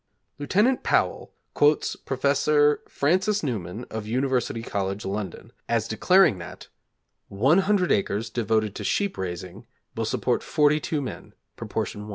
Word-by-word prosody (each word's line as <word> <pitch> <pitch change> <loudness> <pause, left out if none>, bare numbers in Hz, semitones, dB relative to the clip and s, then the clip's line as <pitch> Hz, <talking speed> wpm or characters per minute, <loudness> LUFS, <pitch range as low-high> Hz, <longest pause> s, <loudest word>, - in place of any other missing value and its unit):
Lieut. 210 - +2
Powell - - 0 0.2
quotes 145 +1 +2
Prof. 145 +2 +2
Francis 185 +7 +1
Newman 110 - -4
of 110 -1 -5
University 125 -1 -1
College, 100 -1 -3
London, 95 -2 -5 0.2
as 115 -1 +1
declaring 150 - +4
that 85 - -10 0.6
100 180 - +2
acres 105 +2 0
devoted 110 -2 0
to - - -6
sheep 200 -1 0
raising 90 -1 -6 0.3
will - - -2
support - - 0
42 150 0 +1
men: 130 - -8 0.2
proportion 105 - -4
1. 105 - -9
125 Hz, 125 wpm, -25 LUFS, 105-150 Hz, 0.6 s, declaring